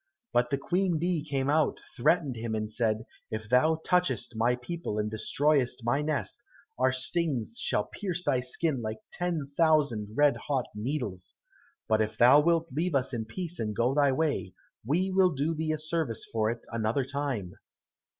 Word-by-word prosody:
But 120 0 +3
the 140 - +1
Queen 180 +4 0
bee 170 -1 0
came 140 -3 -1
out, 150 +1 +2 0.2
threatened 145 +1 +2
him 115 -1 -3
and 110 0 -3
said, 110 -1 0 0.2
"If 110 0 -5
thou 155 +7 +3
touchest 180 -9 +1
my 115 +2 +2
people, 125 -2 -5
and 105 0 -1
destroyest 130 +1 +1
my 120 +5 +2
nest, 155 +10 -2 0.4
our 130 - +4
stings 130 -4 -1
shall 105 - +1
pierce 180 - -4
thy 130 - +2
skin 130 +2 -1
like 110 0 -3 0.2
ten 165 -6 -2
thousand 140 -10 +2
red 145 -1 +4
hot 135 -4 +1
needles. 105 -5 -4 0.5
But 110 0 +3
if 110 0 -2
thou 125 +5 +7
wilt 165 +1 +2
leave 165 +2 0
us 130 -1 0
in 115 -2 -2
peace 175 +8 -6
and 105 -1 -2
go 120 +4 +2
thy 140 -1 +4
way, 145 - -1 0.3
we 175 - +1
will 185 -1 +5
do 145 +4 0
thee 160 0 -1
a 155 - 0
service 155 -7 -2
for 110 -1 +2
it 115 0 -5
another 115 +4 0
time." 135 -10 -3
135 Hz, 175 wpm, -29 LUFS, 115-160 Hz, 0.5 s, thou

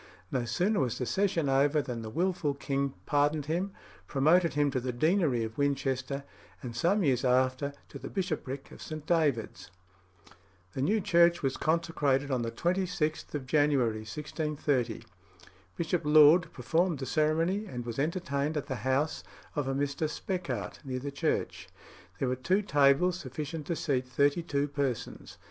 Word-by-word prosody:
No 125 -3 0
sooner 190 - +1
was 125 -4 0
the 125 - -2
session 185 -2 +1
over 140 +3 +3
than 125 -5 -4
the 110 - -6
wilful 170 +1 0
king 140 -1 -2
pardoned 145 0 +1
him, 175 +6 -1 0.4
promoted 160 +4 +3
him 145 -1 +2
to 130 - 0
the 125 +1 -3
deanery 150 - +2
of 110 +3 -6
Winchester, 140 -1 -1 0.4
and 120 -2 -6
some 185 - +2
years 130 -5 +2
after 130 +2 +2 0.2
to 140 - -9
the 135 - -7
bishopric 155 -8 -4
of - - -12
St. 155 -1 -7
David's. 135 - 0 1.0
The 130 - -3
new 210 +10 +2
church 170 -2 +4
was 135 -1 0
consecrated 150 -4 0
on 130 -2 +1
the 115 - -2
26th 170 +2 -1
of 140 -3 -3
January 135 -6 +2
1630. 140 0 -2 0.7
Bishop 170 +1 0
Laud 155 +3 +6
performed 165 +6 0
the 135 - -4
ceremony, 165 +8 +1
and 125 -7 -6
was 115 +1 -4
entertained 150 -2 -1
at 145 - -2
the 130 - -4
house 130 +7 0 0.3
of 145 -3 -1
a 135 - -1
Mr. 145 +2 -1
Speckart, 180 +2 -4
near 130 -2 -4
the 140 +2 -4
church. 140 - -2 0.5
There 135 - -1
were 125 - 0
two 185 +11 +1
tables 145 +3 +3
sufficient 150 +3 -6
to 170 - -1
seat 130 -5 -1
thirty 140 +5 +2
two 145 -3 -1
persons. 140 -4 -4
145 Hz, 160 wpm, -30 LUFS, 130-165 Hz, 1.0 s, Laud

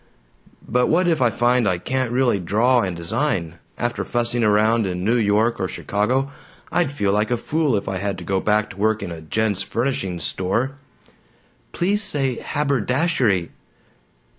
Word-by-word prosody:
"But 125 +2 +2
what 175 +3 +2
if 165 -5 +1
I 120 - +4
find 120 0 +2
I 90 - 0
can't 130 +6 -2
really 125 -4 +2
draw 115 +8 +2
and 95 -4 -2
design? 85 - -2 0.2
After 120 0 -2
fussing 120 0 0
around 110 +1 +3
in 90 -1 -3
New 115 +5 +2
York 110 +1 +2
or 95 - 0
Chicago, 125 +10 -1 0.4
I'd 175 -6 +1
feel 100 -9 0
like 105 +1 +1
a 120 - +1
fool 150 +1 0
if 100 - -5
I 95 - -2
had 100 +1 -2
to 90 - -8
go 95 +2 0
back 105 +2 +1
to 95 - -13
work 110 +1 +1
in 90 - -5
a 80 -1 -7
gents' 100 +4 -1
furnishings 95 -7 -2
store!" 115 +8 -1 1.0
"Please 200 +4 0
say 135 - 0
'haberdashery.'" 130 - 0
115 Hz, 165 wpm, -22 LUFS, 100-130 Hz, 1.0 s, I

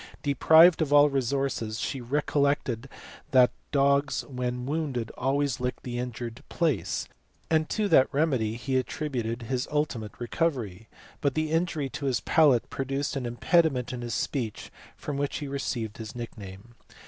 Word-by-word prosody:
Deprived 160 +5 +6
of 150 -3 0
all 145 0 +6
resources 135 -4 -1
she 135 - -3
recollected 140 -1 0 0.4
that 125 -2 +5 0.2
dogs 140 0 +2
when 125 -2 -3
wounded 140 -6 -2
always 135 0 0
licked 125 0 -3
the 120 -1 -4
injured 120 -1 -5
place, 145 - -1 0.4
and 160 -1 +2
to 215 -2 0
that 130 -8 +5
remedy 135 -8 +1
he 130 +2 -1
attributed 125 -3 -3
his 125 +2 -2
ultimate 145 -8 -2
recovery, 120 - -2 0.3
but 140 -3 +1
the 155 0 -1
injury 160 -3 0
to 140 +1 -4
his 130 -3 +1
palate 145 -7 +4
produced 135 +1 -2
an 130 -3 -2
impediment 130 0 +1
in 125 - -5
his 120 -1 -3
speech 115 -6 -3 0.3
from 145 - -4
which 140 0 -1
he 145 - -5
received 120 -6 -3
his 110 +2 -7
nickname. 110 -2 -9
135 Hz, 150 wpm, -27 LUFS, 120-145 Hz, 0.4 s, Deprived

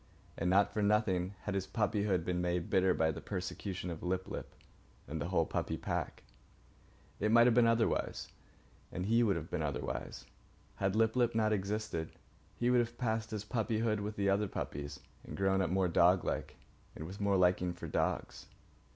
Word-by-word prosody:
And 85 - -1
not 100 +2 +4
for 105 - 0
nothing 100 -3 +1
had 105 - -2
his 95 -1 -2
puppyhood 100 -5 0
been 90 -1 -1
made 90 -1 -1
bitter 95 0 +4
by 80 0 +2
the - - -7
persecution 90 -1 -4
of 80 - -7
Lip 95 +1 -2
lip - - -7 0.5
and 75 +3 -4
the - - -2
whole - - +2
puppy - - -2
pack. - - -3 1.0
It 105 +1 +1
might 115 +1 +7
have 120 - +5
been 120 0 +5
otherwise, 115 0 +1 0.6
and 90 - -3
he 115 +3 +3
would 105 -5 +3
then 85 - -3
have 80 - -15
been - - -1
otherwise. 70 -5 -4 0.5
Had 95 0 0
Lip 110 +1 +3
lip 120 -2 +2
not 110 -1 +3
existed, 100 -4 -2 0.4
he 120 +1 +1
would 125 - +5
have 120 0 -1
passed 110 -2 -1
his 105 -2 -4
puppyhood 110 -1 0
with 105 +1 -4
the 100 -1 0
other 100 +2 +2
puppies 70 -5 -5 0.2
and - - -8
grown 95 0 +2
up 90 - 0
more 95 +1 +2
doglike 90 +1 +2 0.4
and 80 - -6
with 95 +5 -8
more 100 -1 +3
liking 90 0 +3
for 90 - -7
dogs. - - -2
100 Hz, 185 wpm, -33 LUFS, 90-110 Hz, 1.0 s, might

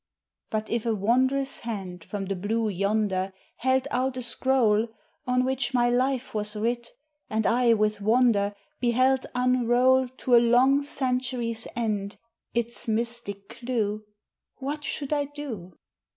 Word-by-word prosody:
But 215 0 -2
if 235 0 -1
a 225 - +2
wondrous 260 +6 +1
hand 190 -7 -6
from 200 +1 -5
the 195 +1 -2
blue 220 +4 -1
yonder 200 -1 0 0.2
Held 260 +2 +1
out 255 +1 0
a 255 - -2
scroll, 235 -3 +2 0.4
On 250 0 +2
which 260 -1 -1
my 240 0 +3
life 255 +1 0
was 210 0 -2
writ, 235 +2 -1 0.4
and 220 0 0
I 240 0 +4
with 210 -1 0
wonder 215 -2 +3 0.2
Beheld 255 +2 +2
unroll 250 +1 +3
To 255 -1 +1
a - - +9
long 250 +4 +4
century's 250 -4 -2
end 210 -3 -2 0.4
its 235 0 -1
mystic 225 -3 -2
clew, 220 -4 -2 0.5
What 290 +2 -4
should 290 -1 -2
I 290 -1 +1
do? 255 - -8
235 Hz, 135 wpm, -26 LUFS, 215-255 Hz, 0.5 s, a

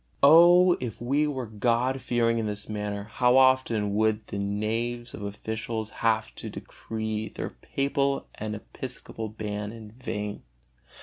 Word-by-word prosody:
Oh, 175 +4 +8
if 120 -5 -5
we 140 +5 +1
were 130 -4 -3
God 120 +4 0
fearing 115 -1 +1
in 110 - -1
this 105 0 -4
matter, 105 -1 -3
how 125 +4 +3
often 130 -6 +4
would 110 +1 +2
the 100 - -5
knaves 115 +4 -2
of - - -7
officiales 110 +2 -4
have 110 -1 +1
to - - -5
decree 110 -1 -5
their - - -5
papal 140 0 -1
and 110 0 -4
episcopal 115 0 -7
ban 105 -1 -4
in 110 -2 -10
vain! 105 -3 -5
110 Hz, 140 wpm, -27 LUFS, 105-125 Hz, -, Oh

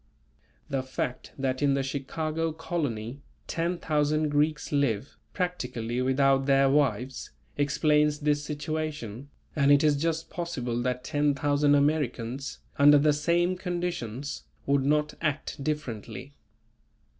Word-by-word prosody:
The 135 -1 -1
fact 130 -1 -4
that 130 -1 -1
in 140 -1 +3
the 135 - 0
Chicago 155 +4 -2
colony, 140 -7 -3 0.2
10,000 155 -3 0
Greeks 150 +1 +1
live, 140 -4 0 0.2
practically 125 - -2
without 135 +1 +3
their 135 -1 +4
wives, 130 -3 0 0.3
explains 150 +1 +2
this 145 0 +1
situation, 150 -5 -4 0.3
and 140 -1 +4
it 145 +1 +6
is 150 -1 +4
just 165 +2 -2
possible 125 -9 -3
that 125 0 -1
10,000 145 0 +2
Americans 140 -3 0 0.2
under 145 +1 +8
the 150 +1 +4
same 170 +4 +1
conditions 170 - -4 0.2
would 140 -1 +2
not 150 +2 +1
act 155 -3 -2
differently. 135 -2 -4
145 Hz, 115 wpm, -28 LUFS, 135-155 Hz, 0.3 s, under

